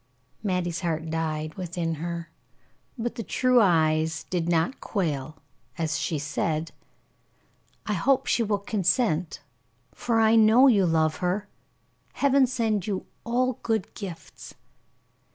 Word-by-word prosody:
Mattie's 180 -4 -1
heart 160 -2 -2
died 155 -1 -2
within 175 -3 -3
her, 170 -1 -5 0.7
but 235 0 -3
the 235 - -5
true 250 +2 +3
eyes 160 -3 +2
did 175 -2 -1
not 170 +10 0
quail, 155 - -2 0.4
as 160 -2 -1
she 160 - -1
said: 155 +2 -2 1.1
"I 210 - -1
hope 265 +7 +2
she - - +1
will 210 -2 +1
consent, 195 - 0 0.5
for 230 -2 0
I 220 0 +5
know 225 +4 +6
you 205 -9 +5
love 160 -1 +1
her. 185 +3 -1 0.7
Heaven 275 -1 +3
send 220 -6 -1
you 195 -3 -3 0.2
all 250 +1 0
good 220 -4 -1
gifts." 185 -5 -9
185 Hz, 125 wpm, -26 LUFS, 160-225 Hz, 1.1 s, know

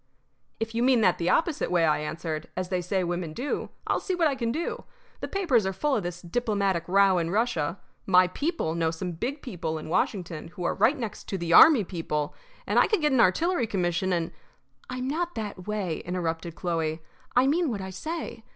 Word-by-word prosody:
"If 225 0 -3
you 230 - 0
mean 250 -2 +4
that 180 - +3
the 170 +1 0
opposite 325 -2 +1
way," 175 -2 +3
I 155 -1 +2
answered, 155 0 -4
"as 185 -1 -2
they 180 -1 0
say 185 +1 -1
women 175 -2 -3
do, 260 - -3 0.2
I'll - - +1
see 375 - -2
what 345 -2 +2
I 290 - +1
can 235 -3 -1
do. 325 +7 -3 0.4
The - - -4
papers 330 - +2
are 190 0 -1
full 285 +8 0
of - - 0
this 175 0 -6
diplomatic 200 -4 0
row 195 0 +4
in 165 -1 -1
Russia. 190 -5 0 0.3
My 185 -1 +6
people 285 - -2
know 165 -1 +1
some 175 +3 -4
big 255 - -4
people 165 -9 -4
in 155 - -7
Washington 175 -2 -1
who 175 +2 -8
are - - +1
right 280 +6 +3
next 230 -5 -5
to 195 - -2
the 170 -1 -1
army 280 - +9
people, 160 -5 -3 0.3
and - - +3
I - - +5
could 425 -6 +1
get 300 -1 +2
an 260 - +3
artillery 265 - +2
commission 185 -2 0
and 170 -2 0 0.3
" 135 0 -34
"I'm 255 0 -3
not 340 +5 -2
that 205 -4 -6
way," 200 -6 -2
interrupted 170 -2 -3
Chloe. 165 -2 -2 0.3
"I 250 +1 +5
mean 315 +3 +2
what 210 -5 -3
I 190 0 -6
say. 240 - -5
190 Hz, 215 wpm, -27 LUFS, 170-245 Hz, 0.4 s, army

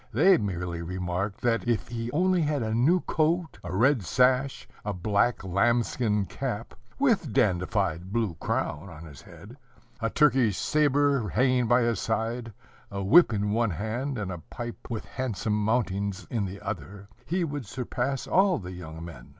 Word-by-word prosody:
They 190 -1 +5
merely 90 -4 -3
remarked, 90 +3 -3
that 115 -1 +1
if 120 -2 0
he 115 0 -4
only 180 +3 +2
had 145 -4 0
a 110 0 -2
new 150 +11 +3
coat, 160 - 0
a 90 - -6
red 125 +4 +4
sash, 130 +6 +2 0.2
a 105 - -2
black 100 +5 +1
lambskin 105 +2 +1
cap, 115 +2 -4 0.2
with 230 - +2
dandified 90 -2 0
blue 110 -5 0
crown, 85 +7 -2
on 85 -1 -10
his 75 0 -12
head, 100 - -13 0.4
a 115 - 0
Turkish 130 -7 +3
sabre 145 -5 +2
hanging 125 +4 +2
by 120 +1 +4
his 115 -1 0
side, 115 +1 -2 0.4
a 100 0 -4
whip 160 - +6
in 105 -1 0
one 115 +1 +2
hand 110 - -3
and 100 -3 -3
a 90 - -5
pipe 120 +8 -8
with 115 -2 -4
handsome 115 -4 -3
mountings 100 -3 -1
in 110 -4 0
the 95 +1 -6
other, 100 0 -6 0.2
he 180 +2 0
would 145 -7 -4
surpass 130 +3 -3
all 190 -1 +3
the 90 -2 -7
young 80 -2 -8
men. 65 -8 -11
110 Hz, 165 wpm, -27 LUFS, 95-130 Hz, 0.4 s, whip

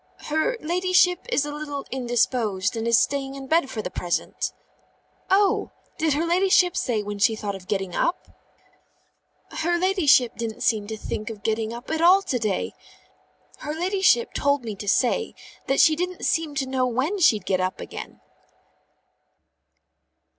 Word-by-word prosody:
"Her 315 +12 0
ladyship 360 +2 +2
is 295 - +1
a 295 - -5
little 290 -2 -5
indisposed, 240 -5 0
and 225 0 -2
is 235 -1 +5
staying 275 0 0
in 270 -1 -8
bed 315 0 +2
for 215 - -5
the - - -5
present." 175 -1 -2 0.8
"Oh! 390 +1 +3 0.3
Did 315 -2 +2
her 310 +4 0
ladyship 360 0 +3
say 220 -4 -1
when 205 0 -6
she 220 +2 +3
thought 210 -2 -4
of 190 -1 -10
getting 195 -3 -2
up?" 340 - -1 1.3
"Her 345 +2 +1
ladyship 345 - +3
didn't 230 -2 -5
seem 215 -3 +1
to 220 0 -5
think 215 +1 -5
of 210 -2 -9
getting 220 0 -1
up 235 +2 -8
at 320 0 -1
all 370 +3 +6
to 260 -10 -1
day. 210 -4 -2 0.9
Her 300 +1 -5
ladyship 360 - +2
told 280 -2 +1
me 220 -3 -5
to 205 - -8
say 255 - +1 0.3
that 270 - +1
she 315 - +6
didn't 360 +2 -3
seem 320 -3 0
to 275 -2 -1
know 260 -1 0
when 265 - -1
she'd 215 - +3
get 185 -1 0
up 185 0 -2
again." - - -9
270 Hz, 160 wpm, -24 LUFS, 220-340 Hz, 1.3 s, all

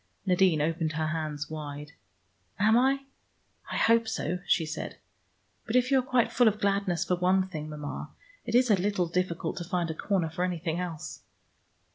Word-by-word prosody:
Nadine 180 -5 +3
opened 160 0 -1
her 160 +1 -1
hands 155 -2 -3
wide. 150 -1 -7 0.7
"Am 215 +2 +4
I? 270 +3 +3 0.7
I - - -1
hope 230 0 +4
so," 180 -5 -2
she 165 - +3
said. 155 +1 -5 0.7
"But 225 - -2
if 250 +1 +3
you 270 - +5
are - - +2
quite 255 -2 +1
full 245 -1 +4
of 215 0 +2
gladness 195 -4 +1
for 180 - +1
one 185 +1 +2
thing, 155 -4 -6
Mama, 150 -1 -6 0.3
it 230 - -2
is 250 -1 +5
a - - +7
little 190 -1 0
difficult 170 -1 -2
to 175 - -3
find 175 -2 -1
a - - -3
corner 175 -1 -1
for 175 +2 -2
anything 170 -2 -2
else." 170 -4 -5
180 Hz, 180 wpm, -28 LUFS, 160-210 Hz, 0.7 s, a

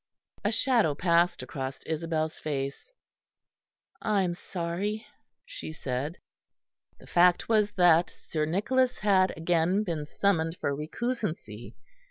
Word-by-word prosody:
A 205 - +1
shadow 225 - +2
passed 170 +2 +2
across 135 -2 -5
Isabel's 160 0 -2
face. 140 - -4 1.1
"I 205 -2 +2
am 175 -1 0
sorry," 185 +5 -3 0.4
she - - -7
said. 145 +2 -4 0.8
The - - -15
fact 175 0 +4
was 210 -2 +2
that 175 -2 +5
Sir 155 -1 -3
Nicholas 250 +10 +1
had 190 -3 +3
again 175 +4 +2
been 160 -6 -3
summoned 165 -2 +1
for 140 - -1
recusancy. 155 - -4
175 Hz, 115 wpm, -28 LUFS, 155-205 Hz, 1.1 s, that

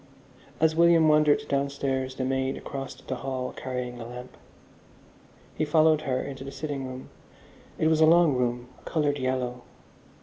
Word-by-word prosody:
As 160 0 +3
William 170 -1 +5
wandered 150 -1 +4
downstairs, 140 -2 -1
the 130 - -2
maid 130 0 -1
crossed 135 -1 -7
the 130 - -3
hall 130 0 -4
carrying 125 -2 -5
a 115 - -7
lamp. 125 +1 -9 1.2
He - - -2
followed 155 0 +4
her 130 0 +1
into 135 -1 -7
the 135 - -7
sitting 140 -2 -4
room. 130 0 -8 0.7
It 155 - +2
was 160 0 +3
a 155 - +7
long 170 -2 +5
room, 125 0 -1
coloured 145 -2 0
yellow. 125 -1 -2
135 Hz, 155 wpm, -27 LUFS, 130-155 Hz, 1.2 s, a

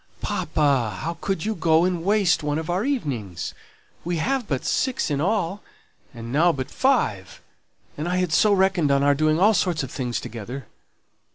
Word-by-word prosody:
"Papa, 130 -9 0
how 165 +1 -4
could 195 -3 -2
you 220 - 0
go 165 -2 +3
and 180 -2 -1
waste 195 -3 +2
one 150 0 -1
of 160 +2 -3
our 185 +4 0
evenings! 125 - -3 0.5
We 175 0 -2
have 255 +7 -1
but 140 +1 -2
six 260 - 0
in 140 0 0
all, 200 +1 0 0.5
and 115 -1 -8
now 170 +4 +4
but 130 -5 -5
five; 105 - 0 0.6
and 155 +4 -3
I 180 - 0
had 180 -4 0
so 210 +6 +4
reckoned 190 -5 +2
on 140 0 +3
our 145 0 +5
doing 155 +2 +2
all 210 +4 +5
sorts 175 -7 0
of 130 - -6
things 125 -4 -3
together." 120 +4 -7
160 Hz, 180 wpm, -23 LUFS, 140-190 Hz, 0.6 s, our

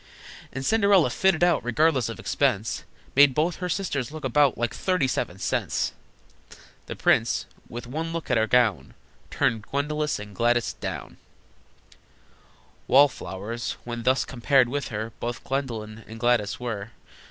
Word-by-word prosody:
And 130 +1 -5
Cinderella, 200 - +4
fitted 190 0 +2
out 175 -1 +3
Regardless 130 0 +2
of 115 - -7
expense, 115 -7 0 0.3
Made 140 -1 +6
both 160 +3 +1
her 180 -1 -4
sisters 145 -10 -2
look 155 -1 -8
about 140 +1 +3
Like 120 -1 -1
thirty 180 -7 +1
seven 95 -7 -2
cents! 95 - -1 0.9
The - - -5
prince, - - +2 0.2
with 120 +1 -7
one 160 +6 -4
look 165 -4 -4
at - - +4
her 110 0 +2
gown, 110 - +2 0.3
Turned 110 -1 +1
Gwendolyn 150 +5 -2
and 105 -1 -9
Gladys 120 +1 +1
down! - - -6 1.7
Wall 140 +2 +7
flowers, 105 +4 -5
when 120 0 -5
thus 130 +3 +2
compared 130 0 +2
with 145 +2 -2
her, 110 +1 -4
Both 120 +1 -4
Gwendolyn 115 -5 -4
and 115 +1 -9
Gladys 120 -4 +1
were. 115 -4 -4
125 Hz, 145 wpm, -25 LUFS, 115-150 Hz, 1.7 s, Wall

